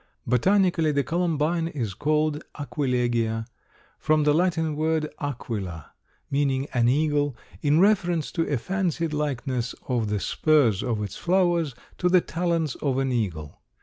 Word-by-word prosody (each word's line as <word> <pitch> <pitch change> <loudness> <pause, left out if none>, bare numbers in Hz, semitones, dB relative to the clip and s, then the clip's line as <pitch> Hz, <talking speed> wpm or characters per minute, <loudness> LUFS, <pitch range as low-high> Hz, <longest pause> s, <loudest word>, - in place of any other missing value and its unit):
Botanically 175 - +3
the 140 -1 +1
Columbine 165 0 0
is 120 -11 -3
called 150 - 0 0.2
Aquilegia, 120 -4 0 0.5
from 155 0 +2
the 150 0 +4
Latin 160 -2 +1
word 155 0 0
Aquila, 105 - -5 0.4
meaning 135 -1 +1
an 120 -1 +3
eagle, 145 -1 +1 0.2
in 150 +1 +3
reference 175 -5 +2
to 165 -3 -1
a 140 - +2
fancied 170 - -1
likeness 130 -4 -2
of 120 -5 0
the 105 -1 0
spurs 135 -6 +2
of 110 -4 -1
its 100 - -6
flowers 175 -6 +1 0.2
to 180 - +2
the 180 0 +6
talons 165 -2 -1
of 135 -3 -1
an 135 -1 0
eagle. 90 -11 -3
145 Hz, 140 wpm, -25 LUFS, 125-165 Hz, 0.5 s, the